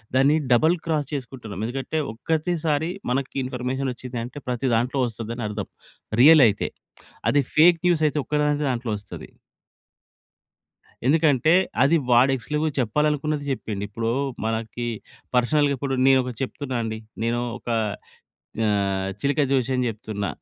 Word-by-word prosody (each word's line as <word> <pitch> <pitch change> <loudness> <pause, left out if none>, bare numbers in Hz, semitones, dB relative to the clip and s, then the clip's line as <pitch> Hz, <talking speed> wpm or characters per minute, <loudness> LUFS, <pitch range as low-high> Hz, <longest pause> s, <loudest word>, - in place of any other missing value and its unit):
దాన్ని 135 +3 +5 0.2
double 155 +8 +5
cross 155 -3 0
చేసుకుంటున్నాం. 120 -7 -6
ఎందుకంటే, 135 +6 -3
ఒక్కటిసారి 160 +3 -1 0.2
మనకు 135 +1 -1
ఇన్ఫర్మేషన్ 130 +1 -2
వచ్చింది 125 0 -7
అంటే, 125 +5 -9
ప్రతి 125 +1 -1
దాంట్లో 125 +4 0
వస్తది 115 -1 -5
అని 120 - -5
అర్థం. 105 -1 -4 0.5
రియల్ 155 +1 +8
అయితే. 105 -1 -1 0.6
అది 145 +4 +4
ఫేక్ 165 +2 +6
న్యూస్ 170 -3 +2
అయితే 150 - -2
ఒక్క 150 - -3
దాం 150 0 +2
దాంట్లో 120 -2 -2
వస్తది. 100 - -10 1.8
ఎందుకంటే, 155 0 +4 0.3
అది 155 +5 +4
వాడు 125 +3 +6
ఎక్స్‌క్లూజివ్‌గా 150 +6 -2
చెప్పాలనుకున్నది 150 +4 0
చెప్పిండు. 105 -6 -4
ఇప్పుడు 115 +2 -2 0.4
మనకి 115 +1 -3 0.5
పర్సనల్‌గా 140 +3 +3
కూడా 135 -1 0
నేను 135 -1 +6
ఒకటి 125 -2 -6
చెప్తున్నా 130 -1 -4
అండి. 110 -1 -4 0.2
నేను 120 +1 0 0.2
ఒక - - -9 1.0
ఆహ్, 100 -2 0
చిలక 145 +4 +1
జోష్యం 130 -1 +1
చెప్తున్నా. 105 -2 -4
130 Hz, 130 wpm, -24 LUFS, 115-150 Hz, 1.8 s, రియల్